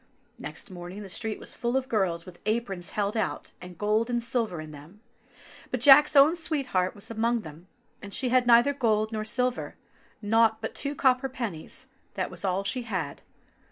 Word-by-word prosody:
Next 215 - -7
morning 180 +3 -8
the 195 - -9
street 220 +2 -2
was - - -9
full 240 +1 -1
of 265 -1 -2
girls 190 -8 0
with 180 -1 -13
aprons 200 -5 -2
held 205 +1 -2
out, 220 - -2
and 180 -1 -10
gold 215 +4 +1
and 240 - 0
silver 230 -8 -1
in 155 0 -8
them; 155 +7 -13 0.7
but 255 - -2
Jack's 285 +4 +7
own 285 +4 +7
sweet 315 -4 -1
heart 185 0 +1
was 205 +2 -7
among 230 +1 0
them, 160 +1 -12 0.3
and 200 - -9
she 250 +5 0
had 250 0 +3
neither 240 +4 +6
gold 220 -4 +1
nor 215 -1 -2
silver; 250 +3 -1 0.4
nought 220 +1 +3
but 220 - -5
two 285 0 -3
copper 260 -1 +2
pennies, 225 -11 -6 0.3
that - - -2
was - - -7
all 190 0 0
she 200 +6 -1
had. 185 -11 -4
220 Hz, 190 wpm, -27 LUFS, 190-250 Hz, 0.7 s, Jack's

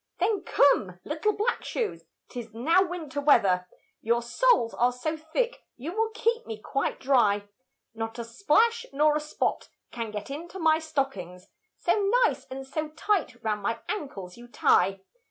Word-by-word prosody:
Then 420 -4 +1
come, 195 -10 +3
little 310 +8 0
black 435 +4 -1
shoes, 455 -4 -3 0.2
'tis 230 -3 -8
now 325 +11 +4
winter 330 -6 -3
weather, 195 -11 +4 0.3
Your 235 +1 +1
soles 240 - +3
are 245 +1 +2
so 280 +6 -3
thick, 325 +11 -2 0.2
you 280 +7 -5
will 445 0 +1
keep 460 +1 0
me 220 - -5
quite 275 +5 -2
dry; 210 -7 +3 0.5
Not 225 +1 -5
a 235 - -3
splash 420 - +2
nor 300 +2 +3
a - - +2
spot 300 0 -2 0.2
can 230 -2 -4
get 210 +4 -6
into 335 +6 -7
my 320 -3 +3
stockings, 270 - -3 0.3
So 405 -2 +1 0.2
nice - - -1
and 270 +1 -7
so 305 +3 -3
tight 310 - -1
round 210 -2 -1
my 230 +3 -1
ancles 220 - -5
you 240 0 -12
tie. 195 -4 +3
275 Hz, 160 wpm, -27 LUFS, 225-335 Hz, 0.5 s, now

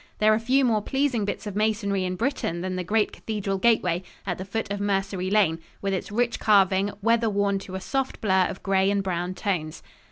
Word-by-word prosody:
There 215 0 +4
are 215 - +2
few 260 +4 +2
more 220 -3 +2
pleasing 265 -2 0
bits 205 - -4
of 205 -2 -5
masonry 205 -3 0
in 180 0 -2
Britain 180 - -2
than 185 0 -3
the 180 - -2
great 210 +4 +1
cathedral 200 -3 -3
gateway 185 -6 +2 0.2
at 180 -3 -3
the 185 - -5
foot 205 +1 -3
of 205 - -2
Mercery 195 -2 -1
Lane, 190 -6 +3 0.2
with 195 -1 -2
its 190 +2 -3
rich 235 +2 0
carving, 200 -1 +3
weather 230 0 +3
worn 200 -1 +1
to 190 -1 -8
a - - -2
soft 270 +7 -2
blur 190 -4 +3
of 190 - -8
gray 195 0 +2
and 200 -1 +1
brown 180 0 -2
tones. 170 -7 -3
200 Hz, 215 wpm, -25 LUFS, 190-220 Hz, 0.2 s, There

